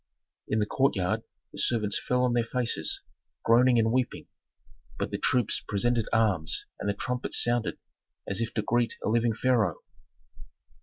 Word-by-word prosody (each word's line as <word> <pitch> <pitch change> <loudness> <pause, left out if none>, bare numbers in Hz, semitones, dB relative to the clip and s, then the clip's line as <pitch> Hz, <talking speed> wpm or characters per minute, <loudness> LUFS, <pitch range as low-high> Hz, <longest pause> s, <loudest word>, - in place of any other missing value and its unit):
In 110 - 0
the 105 - +2
courtyard, 105 -7 +1 0.3
the - - -7
servants 105 -4 +1
fell 125 0 +1
on 125 -1 +2
their 120 -1 +2
faces, 115 -9 0 0.4
groaning 120 +2 +5
and 110 -1 +3
weeping, 125 0 -1 0.7
but - - -3
the - - -3
troops 125 -3 +1
presented 115 +2 0
arms 100 -8 +1
and 105 - -2
the 100 - 0
trumpets 125 +4 -1
sounded, 120 -1 0 0.5
as 100 +2 -1
if 115 - -2
to 110 - 0
greet 120 +1 0
a - - +1
living 115 0 +2
pharaoh. 115 -9 +1
115 Hz, 155 wpm, -28 LUFS, 105-120 Hz, 0.7 s, groaning